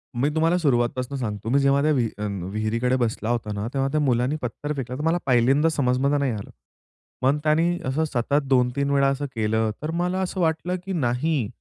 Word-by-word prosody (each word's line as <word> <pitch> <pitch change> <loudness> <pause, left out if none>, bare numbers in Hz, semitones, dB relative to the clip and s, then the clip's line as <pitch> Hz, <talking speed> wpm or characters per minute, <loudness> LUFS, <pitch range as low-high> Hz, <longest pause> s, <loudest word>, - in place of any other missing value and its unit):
मी 135 +5 +1
तुम्हाला 165 +3 +3
सुरुवातीपासून 130 -2 0
सांगतो 105 -3 -4
मी 140 +3 +3
जेव्हा 140 0 +3
त्या 155 +1 +2
विहि 120 -6 +1
अ, 105 - -3 0.3
विहिरीकडे 115 +4 0
बसला 115 -2 -1
होता 115 -3 -1
ना 100 +2 -3
तेव्हा 135 0 +1
त्या 155 - +1
मुलाने 125 +1 +1
पत्थर 145 +5 -4
फेकला 125 -3 -5
तर 145 - -5
मला 165 +2 +2
पहिल्यांदा 135 +5 +3
समजमध्ये 140 0 +1
नाही 140 -3 0
आलं. 105 -3 -6 0.7
मग 135 +3 +3
त्यांनी 165 +3 +2
असं 140 +5 0
सतत 140 +2 0
2-3 130 +1 +2
वेळा 140 -1 +3
असं 140 +1 -2
केलं, 110 0 +1
तर 155 +1 -3
मला 180 +2 -1
असं 185 0 -3
वाटलं, 165 +2 0
की 195 - -3
नाही. 135 - 0
135 Hz, 195 wpm, -24 LUFS, 120-150 Hz, 0.7 s, तुम्हाला